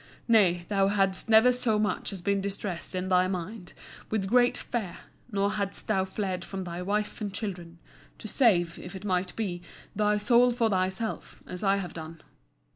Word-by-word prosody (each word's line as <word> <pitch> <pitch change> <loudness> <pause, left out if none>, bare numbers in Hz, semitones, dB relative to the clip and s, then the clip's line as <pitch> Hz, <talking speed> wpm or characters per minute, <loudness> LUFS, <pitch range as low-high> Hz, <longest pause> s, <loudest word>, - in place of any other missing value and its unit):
Nay, 185 -7 +4
thou 195 -2 +2
hadst 195 0 +1
never 225 +3 +7
so 240 -3 +1
much 210 -1 -1
as 190 -3 -7
been 200 +1 +1
distressed 195 -2 -5
in 185 0 -2
thy 185 0 +4
mind 185 +1 -5 0.4
with 215 -3 0
great 245 +4 +3
fear, 220 -7 -4 0.3
nor 200 0 +1
hadst 200 -2 -3
thou 190 -3 +2
fled 190 -2 -3
from 190 +1 -5
thy 175 0 -5
wife 210 +4 -2
and 205 -1 -2
children, 180 -4 -6 0.4
to 220 - -8
save, 180 -9 +2
if 180 +2 -9
it 190 +2 -8
might 185 -2 -1
be, 185 -6 -3 0.3
thy 210 0 +2
soul 240 +4 +4
for 235 -2 +1
thyself, 190 +4 -2
as 180 +2 -7
I 195 0 +4
have 185 -3 -5
done. 160 0 -8
195 Hz, 180 wpm, -28 LUFS, 180-215 Hz, 0.4 s, never